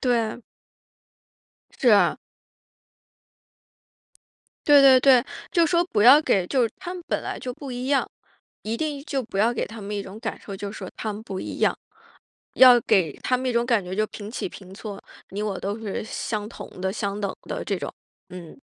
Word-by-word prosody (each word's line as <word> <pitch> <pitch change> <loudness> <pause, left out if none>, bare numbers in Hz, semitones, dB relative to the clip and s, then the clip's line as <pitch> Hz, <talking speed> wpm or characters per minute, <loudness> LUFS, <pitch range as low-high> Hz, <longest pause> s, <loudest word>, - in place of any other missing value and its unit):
对。 235 -2 0 1.3
是 250 - +1
啊。 200 - +4 2.5
对 290 -1 +8
对 265 -2 +8
对， 255 -2 +6 0.3
就 340 -4 +4
说 345 +1 +2
不 210 -12 0
要 260 +6 +9
给 195 - +1
就 250 -4 +2
他 355 - -6
们 360 -2 -7
本 - - -1
来 - - -5
就 250 -1 -5
不 275 -1 -8
一 245 +1 -4
样， 275 0 +1 0.5
一 220 +2 -2
定 290 +1 -3
就 270 -2 -1
不 220 -4 -7
要 230 +4 +3
给 - - -2
他 225 0 -10
们 205 +1 -5
一 200 - -2
种 195 +2 -10
感 225 -1 -5
受， 200 -2 -8
就 200 0 -5
说 195 -4 -7
他 215 -1 -3
们 210 - -8
不 195 -5 -6
一 - - -6
样。 - - +2 0.8
要 250 -2 +8
给 175 -9 +2
他 255 - +1
们 255 0 -3
一 - - 0
种 235 0 +2
感 235 -4 +2
觉 185 +1 -6
就 215 0 +1
平 210 0 -8
起 - - -4
平 190 0 -13
坐， 205 -1 -8 0.3
你 205 +2 -4
我 200 -3 -2
都 200 +2 -3
是 215 -1 -4
相 215 -1 -4
同 - - -9
的、 190 0 -1
相 200 -1 -3
等 200 -2 -2
的 - - -5
这 - - -1
种。 - - -5 0.4
嗯。 180 +6 -11
225 Hz, 210 characters per minute, -24 LUFS, 200-255 Hz, 2.5 s, 要